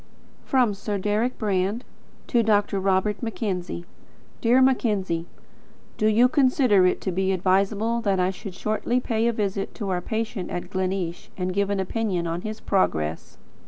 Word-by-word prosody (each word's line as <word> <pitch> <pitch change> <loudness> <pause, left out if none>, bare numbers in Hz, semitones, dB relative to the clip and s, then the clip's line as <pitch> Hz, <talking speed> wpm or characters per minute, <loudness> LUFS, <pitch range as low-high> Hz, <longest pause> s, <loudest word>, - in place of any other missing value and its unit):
From 250 -5 +2
Sir 200 +1 -3
Deryck 210 +5 0
Brand 205 +2 0 0.4
to 240 - +2
Dr. 205 -2 +2
Robert 195 +2 +1
Mackenzie. 190 -7 -3 0.6
Dear 240 +2 +4
Mackenzie: 205 -10 +1 0.7
Do 215 - +3
you 225 +3 +5
consider 255 -8 +4
it 180 - +1
to 190 - -2
be 190 +2 0
advisable 200 +5 +1
that 200 -4 +1
I 180 +1 +2
should 195 0 -9
shortly 215 +5 0
pay 230 -2 0
a - - +3
visit 200 -3 -2
to 205 -4 -4
our 180 -1 0
patient 220 -2 -3
at 175 - -5
Gleneesh 185 -2 -2
and 185 -1 -2
give 200 +1 +1
an 200 -1 0
opinion 190 -2 -1
on 170 +1 -2
his 215 +1 -5
progress? 80 - -1
200 Hz, 160 wpm, -24 LUFS, 185-225 Hz, 0.7 s, you